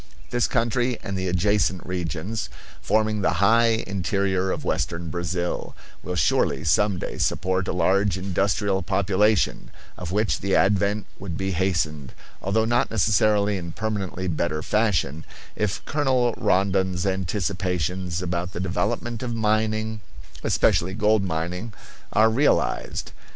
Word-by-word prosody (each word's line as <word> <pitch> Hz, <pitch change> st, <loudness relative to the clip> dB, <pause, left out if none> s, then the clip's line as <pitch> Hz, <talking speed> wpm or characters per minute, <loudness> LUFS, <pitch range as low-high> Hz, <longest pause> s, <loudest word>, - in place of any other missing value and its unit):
This 120 Hz, -1 st, +2 dB
country 120 Hz, +1 st, 0 dB
and 100 Hz, -, -4 dB
the 95 Hz, 0 st, -2 dB
adjacent 95 Hz, 0 st, +1 dB
regions, 90 Hz, -, -3 dB, 0.3 s
forming 110 Hz, 0 st, +1 dB
the -, -, +2 dB
high 115 Hz, +2 st, +4 dB
interior 95 Hz, 0 st, 0 dB
of -, -, -3 dB
western 85 Hz, +6 st, -2 dB
Brazil, 85 Hz, +1 st, -3 dB, 0.3 s
will 90 Hz, -, -4 dB
surely 90 Hz, -, +2 dB
some 105 Hz, -2 st, +2 dB
day -, -, -5 dB
support 95 Hz, 0 st, 0 dB
a -, -, 0 dB
large 95 Hz, +1 st, +2 dB
industrial 95 Hz, +1 st, 0 dB
population; 100 Hz, +1 st, +1 dB, 0.3 s
of 90 Hz, -1 st, -5 dB
which 105 Hz, +2 st, +1 dB
the 100 Hz, 0 st, 0 dB
advent 100 Hz, +1 st, +2 dB
would 90 Hz, -4 st, -5 dB
be 95 Hz, 0 st, -2 dB
hastened, 80 Hz, -6 st, -1 dB, 0.3 s
although 110 Hz, +4 st, +1 dB
not 120 Hz, +2 st, +2 dB
necessarily 105 Hz, -1 st, +2 dB
in 85 Hz, -2 st, -6 dB
permanently 100 Hz, -4 st, -3 dB
better 80 Hz, -2 st, -1 dB
fashion, 90 Hz, -9 st, 0 dB, 0.3 s
if 105 Hz, -3 st, -2 dB
Colonel 130 Hz, -5 st, +1 dB
Rondon's 95 Hz, -3 st, +1 dB
anticipations 90 Hz, -2 st, -1 dB
about 90 Hz, +1 st, -3 dB
the -, -, -4 dB
development 115 Hz, +4 st, -2 dB
of 120 Hz, -2 st, -3 dB
mining, 110 Hz, 0 st, 0 dB, 0.4 s
especially 95 Hz, +2 st, +2 dB
gold 105 Hz, 0 st, +3 dB
mining, 90 Hz, +5 st, -3 dB, 0.4 s
are 110 Hz, +1 st, +4 dB
realized. 140 Hz, +6 st, +1 dB
95 Hz, 130 wpm, -24 LUFS, 90-110 Hz, 0.4 s, high